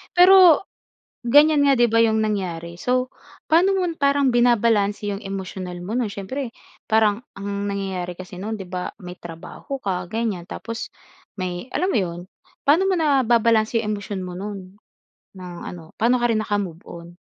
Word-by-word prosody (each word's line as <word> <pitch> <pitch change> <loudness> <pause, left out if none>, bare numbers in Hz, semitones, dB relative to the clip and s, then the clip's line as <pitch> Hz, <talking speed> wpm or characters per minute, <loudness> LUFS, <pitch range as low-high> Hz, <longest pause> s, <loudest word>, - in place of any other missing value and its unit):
Pero, 365 -2 +7 0.6
ganiyan 290 +4 +5
nga 275 - +5
‘di 240 -2 +4
ba 230 - +3
yung 220 -1 +2
nangyari. 175 -5 -3
So 255 +1 0 0.4
paano 360 +5 +4
mo 380 - +1 0.2
parang 280 -1 +3
binabalanse 225 -4 +2
yung 200 - -5
emosyonal 190 -2 -6
mo 190 +4 -6
nun? 240 -4 0
Siyempre, 230 +6 -5 0.3
parang 220 -1 +3 0.2
ang 200 0 -4
nangyayari 190 -3 -3
kasi 185 0 -10
nun 215 +4 -4
‘di 195 - -7
ba, 180 0 -5
may 180 0 -9
trabaho 170 +10 -8
ka 180 -2 -2
ganiyan, 215 -4 -3
tapos 230 +3 -6 0.5
may 180 +1 -4
alam 370 +2 +1
mo 240 - +2
yun, 175 -3 -2 0.5
paano 325 +7 +4
mo 385 - +2
nababalanse 235 -7 +3
yung 210 -1 -2
emosyon 205 -1 -5
mo 180 - -6
nun 195 -1 -8 0.6
ng 180 -1 -8
ano, 165 -2 -9
paano 240 +3 +3
ka 240 - +1
rin 215 - +1
nakamove-on? 175 -4 -5
210 Hz, 160 wpm, -22 LUFS, 185-245 Hz, 0.6 s, Pero